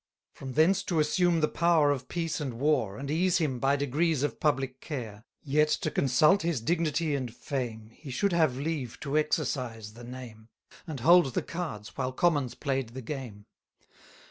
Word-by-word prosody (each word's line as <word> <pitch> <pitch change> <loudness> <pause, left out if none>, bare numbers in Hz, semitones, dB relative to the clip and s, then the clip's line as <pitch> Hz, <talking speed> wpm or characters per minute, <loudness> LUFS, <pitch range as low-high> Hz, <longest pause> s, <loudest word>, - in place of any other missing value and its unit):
From 135 -1 -8
thence 180 +7 +4
to 170 -3 0
assume 170 +2 +2
the 155 - +3
power 165 -4 +3
of 130 -3 -3
peace 165 -2 -2
and 130 -5 -3
war, 130 -6 +1
230 105 - -8
And 140 +1 -4
ease 185 -2 +3
him, 145 -7 -1
by 135 +3 +3
degrees, 145 +2 0
of 145 - -2
public 135 -3 0
care. 115 -7 -6 0.2
Yet, 150 +1 +3
to 155 - -3
consult 150 +9 +4
his 165 -5 0
dignity 155 +3 0
and 130 -4 -2
fame, 120 -4 -4
He 150 - -12
should 190 +9 0
have 155 -7 +2
leave 140 -4 -3
to 140 0 -3
exercise 130 -8 -1
the 120 +2 -12
name, 120 -3 -10 0.4
And 150 -6 -5
hold 165 -3 +5
the - - 0
cards, 155 -12 -6
while 130 -1 -2
commons 145 -5 +1
play'd 135 -4 -2
the 130 - -6
game. 115 -6 -7
140 Hz, 180 wpm, -29 LUFS, 125-160 Hz, 0.4 s, hold